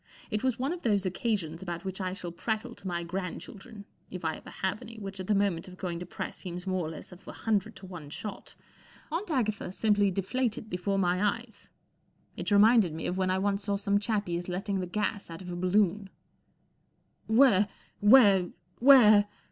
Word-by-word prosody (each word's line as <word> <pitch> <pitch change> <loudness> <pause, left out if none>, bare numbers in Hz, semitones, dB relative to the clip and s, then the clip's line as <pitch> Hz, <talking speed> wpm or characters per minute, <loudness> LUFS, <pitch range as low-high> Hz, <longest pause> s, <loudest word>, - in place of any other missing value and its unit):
It 210 +2 -1
was 260 -3 +1
one 270 +6 -1
of 355 - -7
those 205 -4 +1
occasions 185 -4 -2
about 175 -1 -5
which 190 +1 -4
I 185 -1 -2
shall 175 -3 -5
prattle 220 +7 -3
to 195 - -10
my 170 -1 -2
grand¬ 180 +1 -4
children—if 200 -4 -11
1 160 -1 0
ever - - -11
have 190 +2 -3
any, 230 0 -10
which 195 -2 -7
at 185 - -5
the 210 - +3
moment 195 -4 0
of 185 0 -11
going 175 -3 -4
to 180 - -7
press - - -6
seems 180 -1 -7
more 185 -4 -1
or - - -4
less 160 +3 -9
of 180 +2 -15
a - - -5
hundred 220 0 -1
to - - -11
one 175 -6 -9
shot. 200 +6 -7 0.6
Aunt 350 +6 -3
Agatha 215 - -1
simply 205 0 +2
deflated 215 +4 -2
before 180 +2 -1
my 180 0 +1
eyes. 225 +2 -3 0.7
It - - -4
reminded 205 -4 +5
me 160 - -5
of 180 - -1
when 185 -1 +1
I 185 - +2
once 200 +1 0
saw 200 -1 0
some 200 0 +1
chappies 200 -5 -2
letting 195 +2 -2
the 180 - -3
gas 205 +1 -2
out 165 +2 -8
of 180 - -7
a - - -4
balloon, 195 +2 +1 0.6
" - - -43 0.4
Where—where—where 210 -1 +5
195 Hz, 195 wpm, -29 LUFS, 180-215 Hz, 0.7 s, reminded